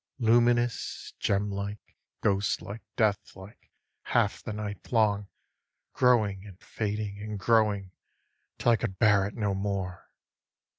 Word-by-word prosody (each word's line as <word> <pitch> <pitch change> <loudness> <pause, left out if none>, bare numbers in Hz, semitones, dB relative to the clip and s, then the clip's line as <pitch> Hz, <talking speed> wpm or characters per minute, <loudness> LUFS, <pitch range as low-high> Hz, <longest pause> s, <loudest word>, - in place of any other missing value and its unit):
Luminous, 120 0 +2
gemlike, 100 +1 -2 0.3
ghostlike, 100 +1 0
deathlike, 100 -1 -2 0.4
half - - +1
the - - -5
night 105 -2 -6
long 105 -4 +2 0.7
Growing 110 -6 +3
and 100 -3 -13
fading 105 -1 -4
and 105 0 -5
growing, 105 -3 +2 0.7
till 120 - +3
I 115 - +4
could 105 -4 -4
bear 100 -2 +4
it 105 - -9
no 105 -3 0
more. 95 -2 -3
105 Hz, 110 wpm, -28 LUFS, 100-110 Hz, 0.7 s, I